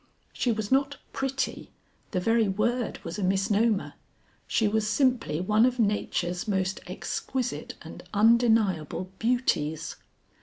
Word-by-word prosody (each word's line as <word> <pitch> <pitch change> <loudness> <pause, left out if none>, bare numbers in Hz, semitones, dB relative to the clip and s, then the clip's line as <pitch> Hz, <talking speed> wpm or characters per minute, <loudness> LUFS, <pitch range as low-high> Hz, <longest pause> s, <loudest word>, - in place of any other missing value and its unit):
She 245 - 0
was 220 -1 -3
not 275 +1 +2 0.2
pretty; 270 0 -2 0.4
the 185 - -1
very 225 +3 +2
word 235 +5 0
was 170 +4 -5
a - - -1
misnomer, 200 +3 +1 0.5
she 220 - +2
was 215 0 +1
simply 235 - +1
one 210 +5 +3
of 250 0 +3
nature's 200 -4 0
most 190 -2 0
exquisite 245 +6 -3
and - - -9
undeniable 215 -6 +3
beauties. 165 -10 0
215 Hz, 120 wpm, -27 LUFS, 190-240 Hz, 0.5 s, one